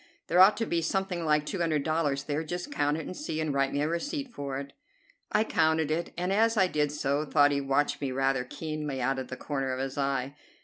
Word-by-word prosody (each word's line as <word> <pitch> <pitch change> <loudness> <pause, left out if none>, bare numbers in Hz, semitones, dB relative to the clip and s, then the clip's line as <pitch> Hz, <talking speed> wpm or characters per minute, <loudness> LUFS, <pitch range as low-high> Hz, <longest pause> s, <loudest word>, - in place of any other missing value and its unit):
"There 175 - +2
ought 190 +3 +8
to 225 - 0
be 170 -5 0
something 180 +1 -1
like 150 -1 +2
two 190 - -4
hundred 155 -4 +1
dollars 150 -3 0
there. 150 +2 -2
Just 175 +3 -5
count 145 +1 +1
it 160 - -5
and 185 - -6
see, 225 - -4
and 155 -2 -1
write 135 0 +1
me 145 - 0
a - - +1
receipt 270 - -3
for 140 -5 -4
it." 140 0 -7 0.6
I 215 - +3
counted 160 -5 +2
it, 170 +2 -1
and, 180 +2 0
as 225 +2 +3
I 190 - +5
did 150 -5 0
so, 145 0 0
thought 145 -1 +4
he 140 0 0
watched 140 +2 0
me 135 -2 -1
rather 135 -1 +1
keenly 150 0 -4
out 130 +1 0
of 130 - -5
the 130 - -6
corner 135 -3 -2
of 130 - -3
his 135 +1 -3
eye. 135 -1 -1
150 Hz, 245 wpm, -29 LUFS, 140-170 Hz, 0.6 s, ought